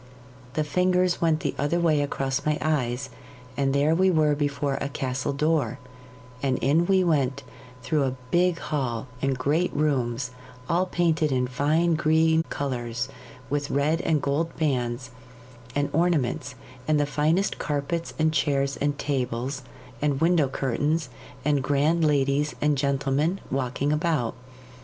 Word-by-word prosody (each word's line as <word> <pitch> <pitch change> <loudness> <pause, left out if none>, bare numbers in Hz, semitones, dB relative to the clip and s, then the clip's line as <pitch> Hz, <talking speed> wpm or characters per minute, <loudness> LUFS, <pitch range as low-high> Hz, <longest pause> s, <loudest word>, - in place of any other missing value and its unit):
The 155 - 0
fingers 180 +3 +1
went 160 -2 +2
the - - -1
other 145 +5 +1
way 155 -4 +3
across 135 -1 -1
my 150 0 +1
eyes, 135 -4 -1 0.4
and 135 0 +1
there 140 +3 +3
we 190 +3 +4
were 155 -4 +3
before 145 -1 -1
a 140 - -2
castle 130 -1 -2
door, 145 -4 0 0.6
and 130 -2 +1
in 160 +6 +2
we 190 -1 +4
went 140 -5 +1 0.4
through 150 -2 +1
a 130 -1 -2 0.2
big 175 0 +3
hall 130 -8 -2 0.2
and 135 -1 0
great 150 +7 +1
rooms 125 -4 0 0.4
all 180 +2 +1
painted 165 -4 +1
in 125 -1 +1
fine 150 +7 +1
green 160 0 +3
colours, 125 -2 -3 0.4
with 145 +1 -2
red 150 +4 +1
and 155 -3 +1
gold 155 +4 -1
bands 125 -4 -1 0.6
and 145 0 +1
ornaments, 145 -6 0 0.3
and 155 -1 +3
the 145 - +2
finest 155 +6 +1
carpets 150 +3 -2
and 155 0 +2
chairs 140 -2 +1
and 145 0 -1
tables 130 -2 -2 0.4
and 145 -2 +1
window 165 -3 +3
curtains, 140 +3 -1 0.4
and 145 -2 +2
grand 145 +5 +2
ladies 145 0 +2
and 150 0 +2
gentlemen 140 +5 0
walking 135 +2 0
about. 150 -7 0
145 Hz, 145 wpm, -25 LUFS, 135-160 Hz, 0.6 s, we